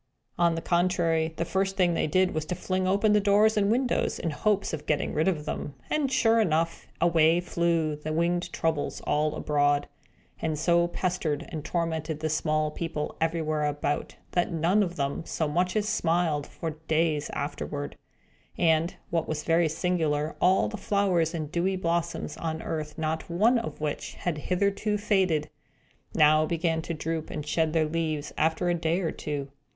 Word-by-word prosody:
On 170 -1 +3
the 165 - -4
contrary, 170 -2 +1
the 170 - -1
first 195 +2 -1
thing 180 -2 +3
that - - -1
they - - +1
did 185 +4 +2
was 155 -1 -2
to 180 - -3
fling 185 +1 -1
open 200 +3 +3
the 210 - +5
doors 210 +2 +4
and 205 -1 +2
windows, 245 +3 +1
in 165 - -2
hopes 205 +5 0
of 150 -1 -5
getting 150 -2 0
rid 155 +3 +1
of 160 -6 0
them; 145 -2 -4 0.2
and, 290 -3 +1
sure 230 -3 +4
enough, 165 -3 0
away 165 0 +4
flew 170 -3 0
the 150 +1 -5
winged 170 +2 0
Troubles 160 -3 -1
all 150 0 0
abroad, 145 -1 +1 0.5
and 155 -1 -1
so 170 +2 +3
pestered 175 -4 -2
and 155 -3 -5
tormented 160 -2 -2
the 155 0 -1
small 155 -1 +1
people, 155 -2 -4
everywhere 160 -2 0
about, 145 0 -2 0.2
that 175 0 +1
none 170 +5 +2
of 180 -3 -1
them 140 +1 -2
so 160 -1 -2
much 180 +5 0
as 215 -1 +1
smiled 165 -6 +1
for 165 - -5
many 155 - -14
days 155 -2 +1
afterward. 145 0 -4 0.6
And, 165 0 +2 0.2
what 165 -2 0
was 155 -1 -3
very 165 0 +3
singular, 155 -3 0
all 185 +1 +4
the 215 - -5
flowers 190 -5 +1
and 155 -2 -4
dewy 180 +3 0
blossoms 170 -1 -2
on 160 -1 -3
earth 150 -2 -4
not 160 +1 -2
one 220 +8 +3
of 230 - -6
which 150 -1 -3
had 165 -4 -3
hitherto 200 +3 +1
faded, 185 -8 +1 0.6
now 155 +1 +5
began 165 -1 0
to 165 +1 -4
droop 160 0 -3
and 150 -2 -5
shed 160 0 0
their 160 -1 +3
leaves, 155 -2 -2
after 160 +3 +1
a 175 - +3
day 170 +1 0
or 165 - -1
two. 140 -2 -5
165 Hz, 180 wpm, -27 LUFS, 155-180 Hz, 0.6 s, the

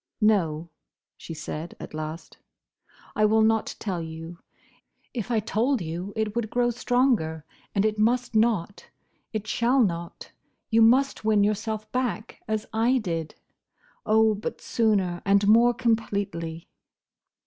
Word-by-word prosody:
"No," 170 -7 +1 0.4
she 165 - -9
said, 155 +2 -6
at - - -9
last, 155 +1 -7 0.8
"I 215 - +2
will 220 +1 +4
not 220 0 +1
tell 185 -5 -3
you. 165 +1 -8 0.7
If 235 -2 -4
I 230 -2 +2
told 230 +5 0
you 175 +3 -5
it 220 -1 -2
would 235 -2 -1
grow 240 +1 +1
stronger; 235 - +1 0.3
and 200 +1 +2
it 215 0 0
must 240 +3 +1
not. 215 -4 +1 0.4
It 215 -2 -3
shall 235 +4 +2
not. 170 -4 -4 0.4
You 225 +1 +5
must 255 +4 +4
win 215 -2 +3
yourself 215 +1 -2
back, 245 -3 -3
as 215 -1 -1
I 235 +4 +3
did. 165 -8 -3 0.7
Oh! 220 0 +4
but 210 +1 -5
sooner, 195 -6 0
and 200 0 +3
more 230 +3 +6
completely!" 200 -9 -2
215 Hz, 135 wpm, -26 LUFS, 175-230 Hz, 0.8 s, more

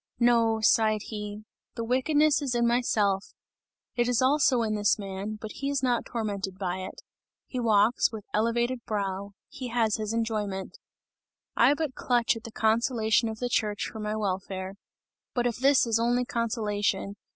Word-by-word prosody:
No," 230 -2 +3
sighed 215 -1 +3
he, 210 -1 -6 0.3
"the 230 - -3
wickedness 295 +5 +2
is 265 -4 -1
in 235 0 +2
myself; 215 -5 +1 0.6
it 240 -1 +1
is 245 -2 +2
also 260 -2 +3
in 215 -1 -1
this 210 -1 +2
man, 200 +1 -5
but 215 0 -7
he 275 - -4
is 280 -2 -1
not 245 -2 +1
tormented 200 -4 -3
by 185 -2 -2
it; 185 - -8 0.4
he 255 - -5
walks 225 +1 +3
with 220 -3 -8
elevated 235 +3 0
brow, 200 -1 -3
he 255 - -7
has 230 -3 +1
his 215 -1 -3
enjoyment; 215 -4 -3 0.8
I 255 +5 +5
but 305 -3 -2
clutch 240 -2 +1
at 225 - -9
the 230 - -7
consolation 225 0 +2
of 220 - -6
the 245 - -2
church 210 -3 -1
for 220 - -8
my 210 0 -2
welfare! 190 -2 -3 0.6
But 245 -1 +1
if 240 -2 0
this 270 +1 +4
is 225 -1 +1
only 245 +2 +1
consolation! 210 -4 -1
225 Hz, 165 wpm, -27 LUFS, 210-245 Hz, 0.8 s, I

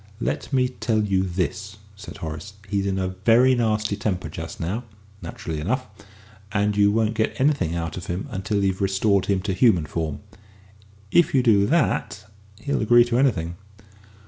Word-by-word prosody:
"Let - - -3
me 130 -2 +3
tell 115 -4 -1
you 95 -2 +1
this," 95 +2 -3 0.2
said 100 - -10
Horace: 80 +5 -7
"he's 100 0 -1
in 95 -1 -1
a 95 -1 -1
very 115 +7 +4
nasty 110 -3 0
temper 100 -2 -2
just - - -7
now, 95 +9 -3 0.4
naturally 80 -2 -6
enough, 130 - -1 0.7
and 105 0 +1
you 100 0 +4
won't 110 0 +1
get 110 -1 -1
anything 130 - +1
out 85 -1 -4
of 90 - -7
him 90 +3 -3
until 100 +2 -1
you 95 - +3
have 95 - -8
restored 100 0 +1
him 100 -2 +1
to 100 0 -2
human 95 -5 +3
form. 80 -2 -4 0.9
If 175 -4 +4
you 130 - +4
do 100 -4 +4
that, 135 - 0 0.4
he'll 140 - -1
agree 120 +2 +6
to 120 0 0
anything." 85 -11 +1
100 Hz, 170 wpm, -23 LUFS, 95-115 Hz, 0.9 s, agree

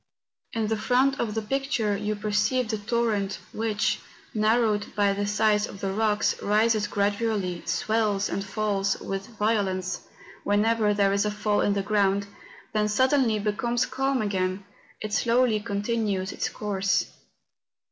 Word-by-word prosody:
In 225 -1 0
the 220 +1 0
front 260 +5 +2
of 220 -2 -2
the 220 - -1
picture 270 -4 0
you 210 +1 -2
perceive 215 +4 0
the 220 - 0
toiTent, 210 -2 -1 0.2
which, 215 -2 0 0.3
narrowed 215 -1 +2
by 200 -1 +3
the 205 +1 -2
sides 210 0 +2
of 195 - -10
the 195 -1 -2
rocks, 210 0 +1
rises 215 +1 +2
gradually, 200 -3 -1
swells 205 +3 +1
and 195 - -2
falls 200 -1 -1
with 195 +4 -6
vio¬ 210 0 +2
lence 185 -1 -3 0.4
whenever 210 +1 +2
there 200 -1 +3
is 200 - +2
a 210 - 0
fall 210 0 0
in 205 - +2
the 200 -1 -1
ground, 200 -1 +2 0.5
then 210 -1 +2
suddenly 260 +1 +3
becoming 210 +3 -1
calm 270 -1 0
again, 190 -1 -1 0.4
it 215 -1 -4
slowly 235 -1 +3
continues 205 -2 -1
its - - -2
course. 200 -2 0
210 Hz, 145 wpm, -26 LUFS, 200-225 Hz, 0.5 s, by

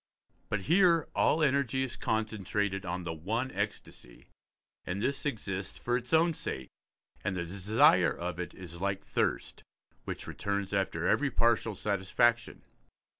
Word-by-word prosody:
But 105 - -1
here 170 - +4
all 155 +1 +3
energy 135 -2 +2
is 125 -2 -4
concentrated 105 -4 -1
on 90 +1 -3
the 85 -1 -3
one 110 +11 -2
ecstasy, 100 - -5 0.6
and 90 +2 -3
this 140 +6 -1
exists 95 - -4
for 120 +9 -1
its 125 -1 -4
own 165 +1 +4
sake, 65 - -5 0.5
and 95 - -1
the 85 -1 -2
desire 100 - +4
of 90 0 -4
it 90 - -5
is 85 -2 -9
like 100 0 -1
thirst, - - -1 0.4
which - - -5
returns 100 -1 -3
after 95 -4 0
every 145 -1 +3
partial 115 -3 +2
satisfaction. 105 +5 +1
100 Hz, 140 wpm, -30 LUFS, 95-125 Hz, 0.6 s, here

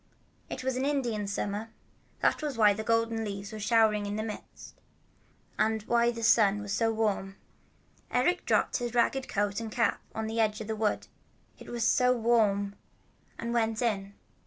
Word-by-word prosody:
It 255 - -5
was 260 -1 -1
Indian 255 -7 -1
Summer. 205 +2 -3 0.5
That - - +2
was 295 -5 -3
why 210 -2 +6
the 220 +2 -4
golden 230 0 +1
leaves 200 0 -5
were 215 - -6
showering 215 -1 +3
in 205 +1 -3
a 215 - -2
mist, 215 -2 -9 0.8
and 220 -1 +1
why 235 +1 +3
the 230 -1 -4
sun 215 -3 +4
was 205 -1 -4
so 225 +2 +2
warm. 205 -3 -1 0.7
Eric 255 +9 +1
dropped - - +2
his 240 -1 -4
ragged 260 +2 +2
coat 205 0 -1
and 225 -1 -5
cap 235 +1 +1
on 220 - -2
the 225 +1 -3
edge 215 -1 +1
of 220 - -5
the 220 +1 -3
wood, 215 -1 0 0.5
it - - -11
was 235 -1 -1
so 250 +1 +3
warm, 210 -4 +2 0.6
and 235 +1 -3
went 225 -2 +1
in. 200 -4 -1
220 Hz, 175 wpm, -29 LUFS, 210-235 Hz, 0.8 s, why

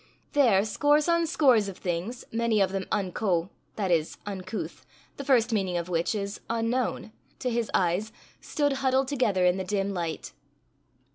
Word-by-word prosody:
There 225 -9 +4
scores 290 +7 +2
on 335 -1 +2
scores 255 -10 +4
of 190 - -9
things, 180 +7 -4
many 230 -1 +1
of 195 -1 +2
them 190 -1 -3
unco, 185 -2 0 0.2
that 195 -4 -1
is 160 -2 +1
uncouth, 185 -7 -5 0.3
the 280 - -5
first 245 -4 +3
meaning 190 -4 0
of 170 +1 -4
which 170 +4 0
is 200 -1 -4
unknown, 230 0 -1 0.3
to 250 - -2
his 230 -2 -1
eyes, 185 +5 +1 0.3
stood 290 -2 0
huddled 265 0 +2
together 220 -10 +1
in 180 +1 +3
the 190 - -2
dim 195 +1 -1
light. 170 -3 -4
205 Hz, 160 wpm, -27 LUFS, 185-245 Hz, 0.3 s, There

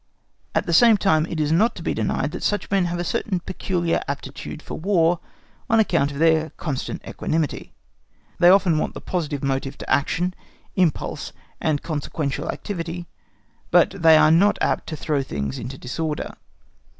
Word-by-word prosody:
At - - +2
the 170 - -1
same 225 +5 +7
time, 160 -5 +2
it 165 - -4
is 150 0 +1
not 215 +9 +3
to - - -8
be - - 0
denied - - -1
that - - -6
such 205 -1 -1
men 195 -2 +3
have 175 0 -2
a 175 - -2
certain 195 -1 -1
peculiar 175 -1 -1
aptitude 140 +1 -6
for - - -8
War, 175 -2 +2 0.5
on 225 - +4
account 165 -9 +2
of 140 - -7
their 160 0 +3
constant 140 -6 -4
equanimity. 155 -3 -2 0.6
They 175 0 +7
often 185 -4 +5
want - - -2
the - - -5
positive 150 -6 -3
motive 135 0 -2
to - - -9
action, 175 +5 +1 0.4
impulse, 180 -6 0 0.3
and 155 -2 0
consequently 145 -2 -3
activity, 175 -3 -4 0.6
but - - +5
they 165 -5 +5
are 155 - +6
not 195 +6 +4
apt - - 0
to 160 - -4
throw 150 -2 -1
things 70 - -4
into 130 +4 -6
disorder. 150 +5 -4
165 Hz, 170 wpm, -23 LUFS, 145-180 Hz, 0.6 s, same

